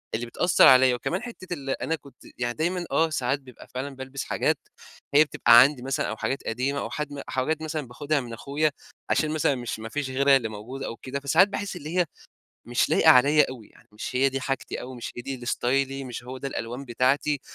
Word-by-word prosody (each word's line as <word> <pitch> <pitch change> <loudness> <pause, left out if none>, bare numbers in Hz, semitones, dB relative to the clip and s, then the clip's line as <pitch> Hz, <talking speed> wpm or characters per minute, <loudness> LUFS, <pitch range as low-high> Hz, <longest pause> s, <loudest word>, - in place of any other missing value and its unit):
اللي 120 +2 -3
بتأثّر 170 +9 +4
عليَّ. 130 -1 +7
وكمان 175 - -2
حتة 200 -7 -7
ال 140 -4 -6
أنا 160 +4 -1
كنت 140 -3 -17
يعني 120 -1 -1
دايمًا 175 +4 -1
آه، 160 0 +3
ساعات 140 -2 -1
بيبقى 130 -3 -15
فعلًا 135 +2 -4
بالبس 130 +1 -6
حاجات - - 0 0.6
هي 150 - +8
بتبقى 120 -5 +6
عندي 135 -1 +3
مثلًا 135 0 -1
أو 110 - -4
حاجات 135 - -2
قديمة 135 +5 -1
أو - - -4
حد 145 -1 -5
حاجات 155 +5 -1
مثلًا 155 -4 -4
باخدها 145 +4 -1
من 120 -2 -8
أخويا 145 +6 0 0.4
عشان 155 -1 +1
مثلًا 150 -3 +1
مش 120 -3 -5
ما 110 - -7
فيش 145 +2 -3
غيرها 135 +1 +4
اللي 115 -4 -4
موجود 115 +6 -7
أو 115 - -4
كده، 135 +2 -5
فساعات 160 +8 +4
باحس 200 -1 -4
اللي 165 +2 -5
هي 175 - +4 0.6
مش 120 0 +1
لايقة 160 - +6
عليَّ 145 +3 +6
أوي 125 -5 -9
يعني، - - -23
مش 115 +4 -5
هي 135 +1 +4
دي 135 0 -3
حاجتي 135 0 -3
أوي، 130 0 -8
مش 120 - -6
هي 120 - -5
دي 135 +1 -4
اللي 120 -1 -9
ستايلي 135 +2 0
مش 120 -1 -7
هو 130 +1 -7
ده 135 - -4
الألوان 120 +2 -5
بتاعتي، 135 +4 +1
135 Hz, 220 wpm, -26 LUFS, 125-150 Hz, 0.6 s, هي